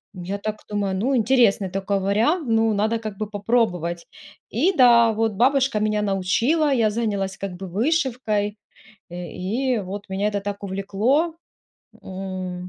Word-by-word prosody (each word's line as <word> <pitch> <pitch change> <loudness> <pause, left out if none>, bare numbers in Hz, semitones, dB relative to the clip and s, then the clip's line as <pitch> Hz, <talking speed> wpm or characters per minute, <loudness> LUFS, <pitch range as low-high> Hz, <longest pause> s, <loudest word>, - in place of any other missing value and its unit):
М, 180 - -7
я 195 +3 -3
так 215 +1 -3
думаю: 200 -2 -1
"Ну, 255 +8 0
интересный 225 -5 +3
такой 195 +1 -1
вариант. 230 - +1
Ну, 225 -1 +3
надо 215 +3 +1
как 215 -3 -6
бы 215 -1 -4
попробовать". 200 -6 -1 0.4
И, 325 - +1
да, 235 -2 +6
вот 220 0 0
бабушка 260 +1 +2
меня 210 0 0
научила, 230 - +1
я 230 -4 +3
занялась 205 -3 -2
как 195 -1 -5
бы 190 +1 -7
вышивкой, 225 - 0 0.5
э, 175 0 -7
и 235 +7 -1
вот 200 +2 -7
меня 200 +2 0
это 205 -1 -2
так 200 0 -5
увлекло. 210 - 0 0.7
М, 185 -1 -6
210 Hz, 150 wpm, -23 LUFS, 195-235 Hz, 0.7 s, да